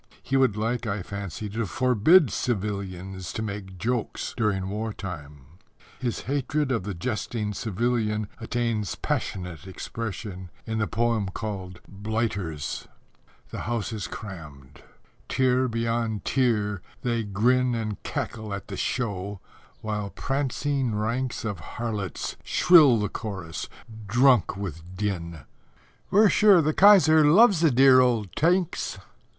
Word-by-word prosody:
He 135 - -2
would 130 -6 +3
like, 115 +2 -1
I 100 -2 -2
fancy, 100 0 -6
to 110 +1 -2
forbid 130 - +4
civilians 95 -5 -3
to 110 - -3
make 100 -3 -6
jokes 115 +4 -2
during 105 -5 0
war 110 +2 -3
time. 75 -8 -8 0.6
His 120 -3 -2
hatred 140 +1 -1
of 115 -7 -1
the 100 -2 -4
jesting 105 +1 -3
civilian 110 0 -1
attains 115 -3 -2
passionate 90 -1 -3
expression 95 -2 -6 0.2
in 110 -1 -2
the 110 - +1
poem 115 -3 0
called 95 -4 -6
Blighters: 100 -7 -3 0.6
The - - -5
House 115 -2 -2
is 105 -4 -4
crammed: 75 - -10 0.5
tier 130 0 +2
beyond 115 -3 -1
tier 105 -7 +1 0.2
they 120 -2 0
grin 120 +5 +2
And 110 -3 -4
cackle 110 -3 -4
at 100 - -9
the - - -5
Show, 100 -5 -2 0.4
while 105 -2 -3
prancing 135 -1 -1
ranks 115 +3 -2
Of 100 -5 -3
harlots 105 +3 -4
shrill 155 -9 +6
the 105 -1 0
chorus, 95 -7 -6 0.4
drunk 120 -2 +4
with 90 -6 -5 0.2
din; 85 -6 -3 0.7
"We're 210 +1 +6
sure 205 -3 +6
the 155 -1 +2
Kaiser 160 -6 +7
loves 190 +5 +6
the 165 - +5
dear 130 0 +6
old 115 -7 +1
Tanks!" 175 +2 +1
110 Hz, 125 wpm, -26 LUFS, 100-125 Hz, 0.7 s, Kaiser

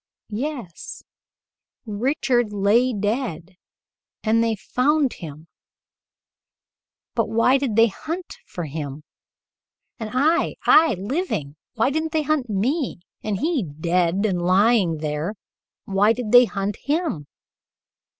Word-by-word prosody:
"Yes, 240 - -5 0.8
Richard 240 +1 0
lay 210 +5 +3
dead 205 - -3 0.7
and 225 +1 +3
they 225 -1 +1
found 275 +6 +1
him, 155 -1 -10 1.7
but - - 0
why 250 +4 +3
did 255 -6 -1
they 225 +1 +7
hunt 325 - -5
for 175 - -5
him? 145 -1 -6 1.0
And 220 -2 -4
I 310 +7 +2
I 315 -6 +6
living 195 - -3 0.2
why 230 +4 +2
didn't 315 +2 -2
they 315 -1 +1
hunt 290 -4 0
me, 250 - -1 0.3
and 205 -2 -2
he, 320 -4 +1
dead 170 +4 0
and 185 -4 0
lying 185 -1 +3
there 155 +6 -2 0.5
why 200 +3 +3
did 230 -3 -4
they 245 0 +8
hunt 200 0 -3
him? 290 - -2
220 Hz, 115 wpm, -23 LUFS, 185-265 Hz, 1.7 s, they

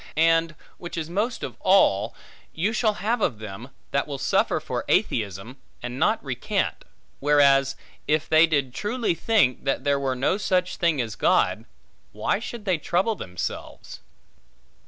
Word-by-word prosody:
And, 165 0 +3 0.2
which 175 0 -7
is 165 0 -4
most 220 +6 -1
of - - -5
all, 115 - +3 0.4
you 200 +7 0
shall 215 -2 +1
have 225 +4 -1
of 120 - 0
them, 110 +3 -8 0.2
that 140 - 0
will 140 -2 -4
suffer - - +1
for - - -4
atheism, 105 +4 -1 0.3
and 125 +1 -5
not - - +1
recant; - - -2 0.3
whereas 140 -2 +4 0.3
if 155 0 +1
they 160 +1 +6
did 140 -5 0
truly 220 - -1
think, 180 - +2
that 135 - 0
there 140 -1 +2
were 135 -2 -1
no 135 +9 +1
such 185 -2 0
thing 170 -5 +1
as 115 -3 -2
God, - - +1 0.5
why - - 0
should 225 -1 -7
they 185 -5 +1
trouble 185 +8 +1
themselves? 90 - -6
155 Hz, 155 wpm, -24 LUFS, 130-190 Hz, 0.5 s, they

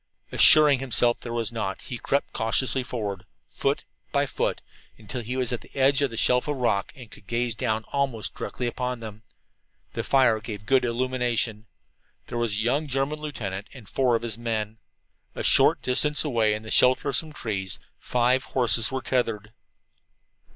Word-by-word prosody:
Assuring 150 -3 +6
himself 120 -2 +1
that - - -31
there 120 - -4
was 115 -1 -1
not, 100 -4 -4
he 125 -4 -6
crept 140 - -1
cautiously 115 +3 0
forward, 105 -7 -4 0.2
foot - - -2 0.3
by - - +2
foot, - - -2 0.4
until 110 +3 -6
he 125 +3 -4
was 125 -2 -1
at 120 - -3
the - - -16
edge 135 +1 +3
of 140 - +2
the 115 - -8
shelf 125 +4 +3
of 145 - -1
rock 120 -6 0
and 125 -5 -12
could 100 - -16
gaze 120 +1 -1 0.4
almost 135 -6 -1
directly 125 - -5
down 120 - -1
upon 125 0 -3
them. 110 -1 -9 0.7
The - - -3
fire 130 -5 +3
gave 105 -2 -8
good 130 +1 +3
illumination. 120 -3 -1 0.6
There 120 - -4
was 115 -3 0
a 105 - -1
young 140 +6 0
German 135 +3 -1
lieutenant 105 -10 -5
and 120 -6 -12
four 125 -3 +2
of 115 - -2
his 115 -1 -3
men. 110 -2 -3 0.6
A - - -4
short - - +4
distance 150 +4 +3
away, 115 -6 +2
in 110 - -7
the 110 - -8
shelter 130 +2 +4
of 135 - -1
some 155 +4 -2
trees, 100 - -4 0.2
five 125 +2 +1
horses 120 -3 +3
were 130 0 -3
tethered. 115 -4 -1
120 Hz, 180 wpm, -25 LUFS, 110-130 Hz, 0.7 s, Assuring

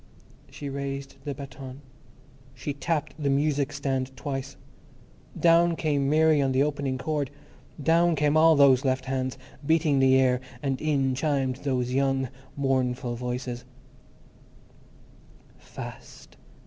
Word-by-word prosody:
She 145 - -7
raised 140 0 -5
the 145 -2 -3
baton; 135 0 -9 0.7
she 135 +3 -4
tapped 150 0 -3
the 140 - +1
music 140 0 +1
stand 135 -2 -3
twice. 135 -2 -5 0.8
Down 170 0 +5
came 145 -4 0
Mary 155 0 +4
on 135 -1 +1
the 130 +2 +3
opening 140 -3 -1
chord; 145 0 -2 0.5
down 170 +2 +4
came 150 0 +2
all 160 0 +6
those 135 -2 +5
left 130 -1 0
hands, 130 -1 -2 0.3
beating 155 -2 +2
the 130 0 +5
air, 125 -1 +2 0.2
and 135 -2 -1
in 140 -4 +1
chimed 135 -2 0
those 125 -3 -1
young, 135 -1 +1 0.3
mournful 130 -2 0
voices:— 125 0 -4 2.0
Fast! - - -11
140 Hz, 120 wpm, -26 LUFS, 130-150 Hz, 2.0 s, all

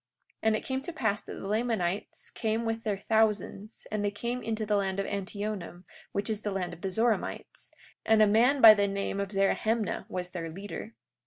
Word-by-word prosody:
43:5 - - -56
And 220 0 +3
it - - -4
came 265 0 -2
to 340 +5 -6
pass 205 -10 0
that - - -8
the - - -7
Lamanites 210 -4 -2
came 225 +1 -1
with 225 0 -1
their 210 -3 -1
thousands; 215 0 0
and 210 -1 -1
they 205 - +2
came 235 +5 -3
into 220 -1 -2
the 210 0 +1
land 195 -1 0
of 195 - 0
Antionum, 200 -2 -4 0.3
which 200 +1 -2
is 215 -2 -2
the 210 - -2
land 185 -3 -3
of 175 - -12
the 195 - -2
Zoramites; 225 +4 -1 0.3
and 220 0 +4
a 215 - +8
man 240 +7 +4
by 220 -1 +12
the 205 -1 +2
name 200 0 -2
of 200 -1 -2
Zerahemnah 210 +2 0
was 180 -2 -4
their 165 -2 -4
leader. 165 - -7
210 Hz, 210 wpm, -29 LUFS, 195-220 Hz, 0.3 s, by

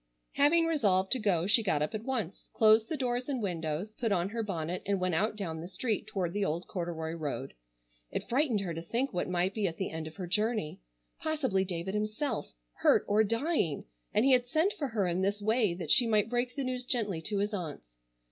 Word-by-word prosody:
Having 330 +4 +4
resolved 200 - +2
to 260 - +3
go 185 -6 +2
she 215 +4 +5
got 160 -8 +1
up 150 - -3
at 215 0 -4
once, 230 -8 -3
closed 220 0 +5
the 315 - -1
doors 250 0 -1
and 270 -3 -1
windows, 175 0 -3
put 230 -1 -2
on 180 -1 +1
her 230 +2 -3
bonnet 180 -4 -3
and 200 -1 0
went 185 -1 0
out 210 +7 +1
down 165 -6 -4
the 170 - -6
street 210 +3 -2
toward 185 -5 -2
the 205 0 0
old 170 -1 -1
corduroy 170 -3 -4
road. 145 -4 -4 0.6
It - - -4
frightened 250 -5 +1
her 180 -4 -3
to 165 - -5
think 235 +10 -1
what 180 0 -1
might 180 +2 +1
be 210 -2 0
at 165 - -5
the 190 - -3
end 160 -1 -4
of 155 - -10
her 185 - -5
journey. 210 -2 -1 0.4
Possibly 270 -12 0
David 180 0 -3
himself, 215 - -2 0.3
hurt - - +4
or 210 +2 +4
dying, 230 - 0 0.3
and 215 - +3
he 275 - +5
had 250 -1 +4
sent 325 +9 +2
for 285 - -3
her 220 -5 0
in 175 +1 0
this 200 +2 0
way 215 -3 +2
that 175 - -3
she 245 - +6
might 215 0 +2
break 245 +1 -1
the 280 - -2
news 255 -1 -2
gently 210 -10 -1
to 205 +5 -2
his 205 +2 0
aunts. 145 - -6
205 Hz, 225 wpm, -31 LUFS, 175-240 Hz, 0.6 s, she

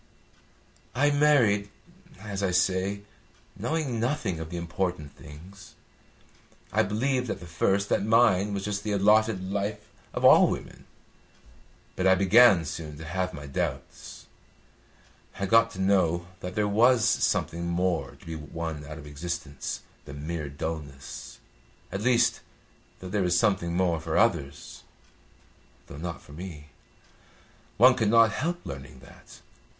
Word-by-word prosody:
"I 145 +3 +3
married, 125 -9 +3 0.5
as 100 -1 -5
I 95 - +1
say, 95 +3 0 0.5
knowing 130 +1 -2
nothing 115 - -1
of 80 0 -6
the 85 - -5
important 85 -3 -3
things. 95 +9 -13 1.0
I - - +4
believed 125 +5 -1
at - - -3
the 90 - -10
first 95 +4 0
that - - +2
mine 105 -3 +3
was 100 -1 -3
just 105 -1 -3
the 105 - -2
allotted 100 -1 +2
life 105 +1 -3 0.2
of - - -2
all - - +8
women. - - -6 1.1
But 95 - +1
I 95 - +6
began 95 -1 +6
soon 75 -2 -6
to 80 - -9
have 90 +4 -2
my 75 -4 -9
doubts. 70 - -5 1.1
I 100 - 0
got 115 +3 +4
to 95 - -9
know 90 -3 +2
that 90 -1 -7
there 105 -1 +1
was 115 +3 +4
something 85 +1 0
more 85 0 -1
to - - -19
be 80 0 -6
won 80 0 -6
out 75 +2 -8
of 75 - -11
existence 75 -1 -5 0.2
than 70 +1 -8
mere 80 -3 -4
dulness; 70 -2 -7 0.5
at 95 +2 -4
least, 120 0 +2 0.6
that 90 0 -8
there 105 0 0
was 90 -1 +2
something 85 -4 +1
more 90 -3 +1
for - - -2
others, 70 0 0 1.0
though 70 - -11
not 85 +2 -6
for 70 - -15
me. 80 -3 -9 1.1
One 125 +4 +7
could 110 -4 0
not 115 -1 +5
help 175 +9 -3
learning 70 -1 -9
that. - - -16
95 Hz, 145 wpm, -27 LUFS, 80-110 Hz, 1.1 s, all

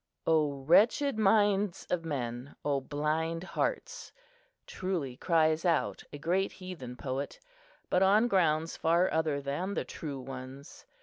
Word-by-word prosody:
"O 150 -4 +1
wretched 220 - +4
minds 205 -2 +3
of 175 -2 0
men! 130 -4 -4
O 140 -2 +1
blind 155 +4 -1
hearts!" 465 - -3 0.5
truly 175 -9 -3
cries 160 +1 +2
out 170 -3 +1
a 145 - -7
great 180 +6 0
heathen 175 -10 -8
poet, 135 - -4 0.5
but 180 - +2
on 205 +5 +5
grounds 165 -6 +2
far 170 +3 +2
other 155 -3 +1
than 170 +9 -3
the - - -2
true 145 -4 -6
ones. 130 +2 -9
160 Hz, 130 wpm, -30 LUFS, 140-185 Hz, 0.5 s, on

